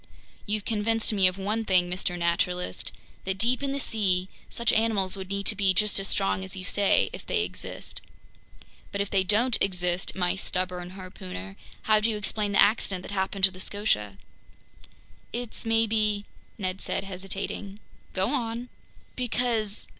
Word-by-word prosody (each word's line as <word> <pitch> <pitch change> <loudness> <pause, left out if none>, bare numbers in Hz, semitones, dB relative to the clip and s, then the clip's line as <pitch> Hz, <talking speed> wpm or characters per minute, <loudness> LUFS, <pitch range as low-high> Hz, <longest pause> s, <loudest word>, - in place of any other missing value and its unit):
"You've 210 0 -1
convinced 225 +1 +1
me 195 -3 +5
of 185 +1 0
one 210 +3 -1
thing, 185 -4 +4
Mr. 180 0 -1
Naturalist. 170 - 0 0.3
That 190 0 -2
deep 240 +6 +2
in 275 -1 -1
the 280 - -2
sea, 190 -7 +1 0.2
such 235 -1 +2
animals 215 -4 +2
would 190 -1 -6
need 200 0 -2
to - - +2
be 195 -2 +3
just 210 +1 +3
as 195 - -2
strong 195 -1 0
as 190 0 -7
you 185 - -4
say—if 200 +1 +2
they 440 -3 +1
exist." - - -6 0.9
"But 200 - -3
if 200 - -2
they 195 -1 +4
don't 220 +6 +4
exist, 180 -1 0
my 180 -1 +1
stubborn 180 -1 -3
harpooner, 95 - -8 0.3
how 215 -1 +4
do 215 +2 +2
you 215 - -1
explain 210 0 -1
the - - +3
accident 195 -4 +1
that - - -8
happened 195 0 -2
to 190 - +3
the 185 - -12
Scotia?" 105 - 0 1.1
"It's 240 -1 -3
maybe... 215 -2 +2 0.2
," - - -32
Ned 190 -2 -3
said, - - -1
hesitating. 195 +1 -5 0.3
"Go 190 +5 +1
on!" 240 -2 -2 0.5
"Because 235 -4 +1
200 Hz, 165 wpm, -27 LUFS, 185-220 Hz, 1.1 s, me